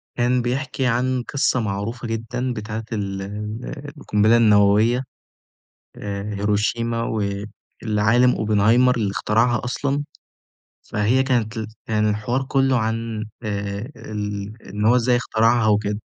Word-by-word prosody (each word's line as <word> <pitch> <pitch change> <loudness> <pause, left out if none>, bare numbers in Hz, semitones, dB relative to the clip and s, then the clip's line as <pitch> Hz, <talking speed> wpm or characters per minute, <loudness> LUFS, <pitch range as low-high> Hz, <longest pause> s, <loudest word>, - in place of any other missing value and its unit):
كان 125 0 +2
بيحكي 130 +2 -2
عن 125 +1 +1
قصة 135 -2 0
معروفة 110 +3 -3
جدًا 115 +3 -3
بتاعة 110 +1 -5
ال 100 -2 -3
ال 105 +8 -6
القنبلة 110 -3 +3
النووية 110 +3 +4 0.9
آآ، 100 +1 -5
هيروشيما 110 +3 0
والعالِم 110 +3 0
Oppenheimer 110 +4 +3
اللي 105 -4 0
اخترعها 115 +4 +1
أصلًا، 140 +3 -1 0.8
فهي 110 +5 +1
كانت 120 -4 0
ال 110 -1 -3 0.2
كان 105 -1 +1
الحوار 110 +5 -1
كله 135 -1 +2
عن 110 -1 -2 0.2
آآ 100 +2 -4
ال 105 -1 -5 0.2
إن 105 +2 -3
هو 120 +3 +5
إزاي 125 0 +3
اخترعها 115 -1 +2
وكده، 105 0 +1
110 Hz, 120 wpm, -22 LUFS, 105-125 Hz, 0.9 s, هو